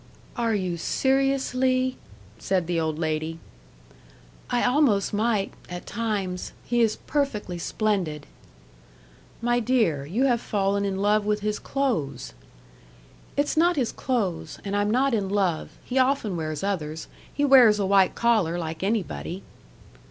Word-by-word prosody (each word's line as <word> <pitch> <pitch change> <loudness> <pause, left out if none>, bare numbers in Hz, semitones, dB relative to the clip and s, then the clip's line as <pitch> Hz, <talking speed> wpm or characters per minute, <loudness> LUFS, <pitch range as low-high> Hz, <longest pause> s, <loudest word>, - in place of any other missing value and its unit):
"Are 230 -2 0
you 185 -4 -2
seriously 260 +2 +1 0.2
" 100 - -23
said 185 -3 0
the 170 0 0
old 160 -1 -1
lady. 160 0 -2 1.1
"I 245 -1 +1
almost 250 -7 +2
might 210 -1 0 0.2
at 175 0 -7
times. 205 -5 -3
He 240 0 +1
is 225 -2 +3
perfectly 215 - -2
splendid." 175 -7 -1 1.2
"My 240 0 +2
dear, 220 - +1
you 215 - 0
have 245 -4 +2
fallen 200 -1 0
in 195 0 -2
love 210 +1 +3
with 210 0 0
his 210 0 -1
clothes." 160 - -2 1.0
"It's 285 +1 +1
not 345 +2 +4
his 255 -6 0
clothes. 215 -10 -2
And 200 0 -2
I'm 205 0 +1
not 260 +4 +2
in 200 -4 0
love. 190 -5 -1
He 260 +1 -1
often 255 -7 +1
wears 155 -1 -3
others. 160 -6 -3 0.2
He 290 - 0
wears 250 -6 +7
a 200 - 0
white 195 -1 +4
collar 215 -8 +2
like 160 -2 -5
anybody." 195 -2 -2
205 Hz, 140 wpm, -25 LUFS, 175-245 Hz, 1.2 s, wears